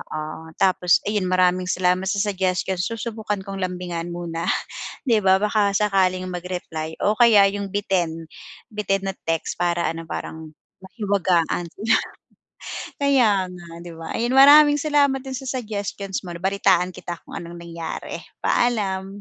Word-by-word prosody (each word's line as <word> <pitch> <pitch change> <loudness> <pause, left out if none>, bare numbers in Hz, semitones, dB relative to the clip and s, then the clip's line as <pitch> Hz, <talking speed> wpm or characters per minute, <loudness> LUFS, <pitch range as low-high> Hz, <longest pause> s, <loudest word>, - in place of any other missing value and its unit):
Oo, 155 +1 -7
tapos 180 -2 +3
ayun 205 -3 -1
maraming 185 0 +2
salamat 180 +1 +1
sa 200 0 +1
suggestions. 185 -2 -1
Susubukan 220 -3 -4
kong 195 -1 -6
lambingan 175 -2 -4
muna, 170 -1 -4 0.6
'di 230 -5 +3
ba, 190 -1 +4
baka 205 -2 +2
sakaling 190 -3 +2
mag-reply 175 -3 -5
o 210 - +4
kaya 225 -4 +7
yung 200 0 -4
bitin, 175 -5 -2 0.4
bitin 195 -2 -1
na 195 - -1 0.2
text 165 -1 -2
para 170 -1 +1
ano 165 0 -8
parang 160 -1 -7 0.3
mahiwagaan 185 -5 0
sila. 220 +3 +1 1.1
Kaya 265 -6 +4 0.2
nga 175 -1 -11 0.2
'di 175 - -9
ba? 165 - -6
Ayun 235 +2 0
maraming 290 +2 +8
salamat 285 -2 +2
do'n 265 -1 -6
sa 265 -2 -5
suggestions 200 -3 -4
mo 180 - -8
'no, - - -7
balitaan 190 -2 +2
kita 175 -1 -6
kung - - -10
anong 170 0 -7
nangyari. 170 -1 -6 0.2
Paalam. 200 -6 +1
190 Hz, 145 wpm, -23 LUFS, 175-210 Hz, 1.1 s, maraming